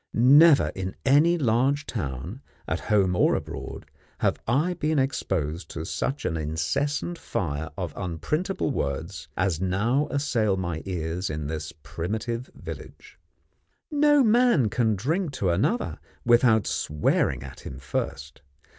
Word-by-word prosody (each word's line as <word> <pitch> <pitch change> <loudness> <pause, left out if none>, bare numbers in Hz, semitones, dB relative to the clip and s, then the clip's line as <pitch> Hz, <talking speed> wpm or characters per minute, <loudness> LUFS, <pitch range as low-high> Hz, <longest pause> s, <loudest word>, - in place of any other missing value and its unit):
Never 135 - +6
in 95 0 -4
any 150 +6 +5
large 135 +2 +2
town, 85 - -5 0.3
at - - -1
home 95 -4 +2
or - - +3
abroad, - - -6 0.3
have - - 0
I 150 +10 +2
been 155 -2 -1
exposed 95 - -1
to 80 -1 -5
such 135 - -3
an 80 - 0
incessant 80 - -1
fire 75 -3 -3
of 90 -6 -4
unprintable 145 - -2
words, 80 - -3
as 90 -3 0
now 110 +10 +1
assail 120 -8 +1
my 85 -4 -3
ears 90 0 -2
in 75 -1 -4
this 75 +1 -4
primitive 110 +8 -4
village. - - -10 0.7
No 295 -1 +5
man 230 - +4
can 110 0 +1
drink 155 - -1
to 95 -8 0
another 110 - 0 0.3
without 120 -3 +5
swearing 75 -2 0
at 70 - -10
him 65 - -8
first. 70 0 -4
105 Hz, 130 wpm, -26 LUFS, -, 0.7 s, Never